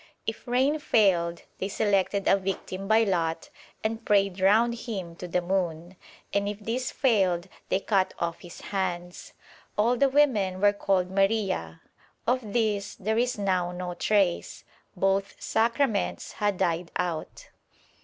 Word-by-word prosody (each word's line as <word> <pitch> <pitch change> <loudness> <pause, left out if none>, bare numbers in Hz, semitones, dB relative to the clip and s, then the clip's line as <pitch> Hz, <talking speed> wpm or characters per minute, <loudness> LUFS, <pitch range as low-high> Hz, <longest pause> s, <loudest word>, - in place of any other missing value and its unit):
If 225 - -5
rain 265 +5 +2
failed 175 - +2 0.2
they 190 - -1
selected 200 -1 +1
a - - +6
victim 195 0 -4
by 220 +2 +5
lot 165 -5 -1 0.3
and 225 +1 -2
prayed 200 -3 +2
round 220 +5 +4
him 200 -8 -6
to 180 - -6
the 180 +1 0
moon, 175 -1 -2 0.4
and 200 0 +1
if 205 - -4
this 235 +4 -2
failed 190 -8 +2 0.2
they 190 - +2
cut 195 -3 +1
off 170 -1 -2
his 175 - -11
hands. 180 -3 -4 0.4
All 230 +4 +3
the 275 +2 +3
women 225 -10 +2
were 205 +1 +4
called 190 -2 0
Maria.' 195 - 0 0.4
Of 245 -3 0
this 210 -3 0
there 220 +3 -1
is 245 0 0
now 185 -3 0
no 180 0 -5
trace. 195 -2 0 0.3
Both 195 +1 0
Sacraments 230 -1 0
had 205 -3 -1
died 170 -2 0
out. 175 -3 -4
195 Hz, 145 wpm, -27 LUFS, 180-220 Hz, 0.4 s, a